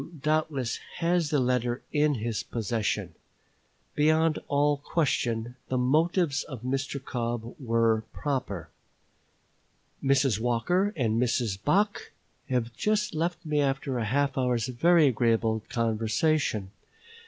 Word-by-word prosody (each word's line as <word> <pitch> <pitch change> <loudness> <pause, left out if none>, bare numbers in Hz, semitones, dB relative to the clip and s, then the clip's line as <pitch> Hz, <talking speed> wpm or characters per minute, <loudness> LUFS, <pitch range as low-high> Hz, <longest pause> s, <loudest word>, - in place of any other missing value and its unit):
doubtless 155 -5 0 0.2
has 170 -2 +1
the 150 - +2
letter 125 -1 0
in 150 -1 +3
his 115 -1 -2
possession. 105 -5 -2 0.8
Beyond 155 +1 +3
all 145 0 +2
question, 120 -6 -1
the 130 - -1
motives 150 +3 +2
of 130 -5 -8
Mr. 135 +2 -2
Cobb 120 -3 -4
were 115 -3 +2
proper. 130 - -3 1.3
Mrs. 135 -5 +3
Walker 175 - +1
and 115 -4 +1
Mrs. 115 -5 0
Bache 205 +7 +1 0.4
have 120 -2 -1
just 210 - 0
left 165 +2 -2
me 150 -1 +1
after 135 -2 -1
a 115 - -1
half 135 +4 0
hour's 125 -3 +1
very 165 +6 +4
agreeable 115 -3 +2
conversation. 115 -1 0
Mrs. 450 +1 -31
130 Hz, 120 wpm, -28 LUFS, 115-150 Hz, 1.3 s, very